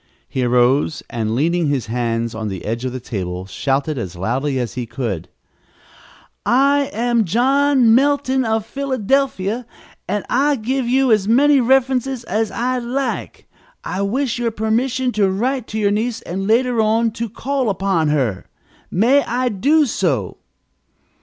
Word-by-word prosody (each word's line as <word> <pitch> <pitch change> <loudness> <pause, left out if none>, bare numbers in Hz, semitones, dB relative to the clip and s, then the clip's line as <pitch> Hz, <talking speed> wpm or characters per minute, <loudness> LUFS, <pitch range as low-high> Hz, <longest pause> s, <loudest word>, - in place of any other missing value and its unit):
He 130 - -2
arose, 125 +5 +2
and, 110 -1 -2
leaning 165 +4 +1
his 140 -4 -1
hands 115 0 -2
on 110 0 -4
the 95 -4 -6
edge 115 +3 -3
of 130 - -2
the 130 - -5
table, 95 -6 -5
shouted 135 +7 -1
as 90 -6 -5
loudly 130 +10 -1
as 120 -3 -3
he 125 -2 -4
could: 115 - -4 1.1
"I 280 +3 +3
am 235 +1 +1
John 255 - +3
Melton, 270 0 +2
of 220 -2 0
Philadelphia. 255 -4 -1 0.4
I 250 +8 +1
will 225 - -9
give 260 +1 -1
you 260 0 +3
as 210 -3 +3
many 280 +5 +5
references 260 0 +1
as 220 -1 -1
you 250 +1 -1
like. 270 +2 -3 0.4
I 190 +1 -3
wish 245 +4 -1
your 235 -1 0
permission 235 +4 0
to 205 -4 +2
write 245 +5 -1
to 215 - -5
your 205 -2 +2
niece 225 +3 -2
and, 195 +3 -4
later 235 +1 +2
on, 225 +1 +2
to 230 +1 -4
call 265 +2 -2
upon 190 -5 0
her. 130 -10 -1 0.4
May 245 +10 +3
I 250 +1 -1
do 290 +9 +3
so?" 150 - -1
220 Hz, 155 wpm, -19 LUFS, -, 1.1 s, many